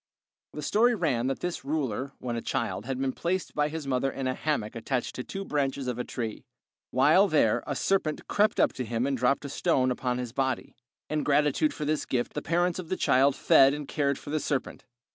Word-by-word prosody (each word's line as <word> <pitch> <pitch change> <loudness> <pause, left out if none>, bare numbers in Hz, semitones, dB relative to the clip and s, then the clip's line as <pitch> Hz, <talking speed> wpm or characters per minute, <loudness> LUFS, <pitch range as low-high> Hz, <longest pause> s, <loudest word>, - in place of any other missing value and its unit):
The 150 - -6
story 235 +9 +3
ran 135 - 0
that 135 - -2
this 180 -1 -3
ruler, 135 -3 -2
when 120 -2 -4
a 115 - -2
child, 115 -3 -2
had 135 -1 -2
been 135 0 0
placed 185 +2 -2
by 150 0 +1
his 160 -1 -5
mother 135 0 0
in 135 0 -5
a 130 - +1
hammock 130 -8 -2
attached 120 +2 -2
to 125 - -5
two 195 +7 -6
branches 140 -3 -1
of 125 -1 -3
a - - 0
tree. 115 -4 -5 0.5
While - - +5
there - - +2
a - - -2
serpent 185 -6 0
crept 210 +1 +2
up - - +4
to 130 - -4
him 115 +1 -1
and 140 0 0
dropped 125 +3 +1
a - - -4
stone 130 -5 +1
upon 125 0 -1
his 125 -2 -5
body. 130 -2 -2 0.3
In 155 0 -1
gratitude 150 - +2
for 150 - -5
this 155 +1 -1
gift 120 -2 -1
the 150 - -3
parents 175 +3 0
of 170 -3 -7
the 185 - -1
child 135 +2 +3
fed 135 +1 +5
and 150 -1 -6
cared 140 -2 0
for 145 - -9
the 155 - +1
serpent. 145 -2 -3
140 Hz, 220 wpm, -28 LUFS, 125-155 Hz, 0.5 s, While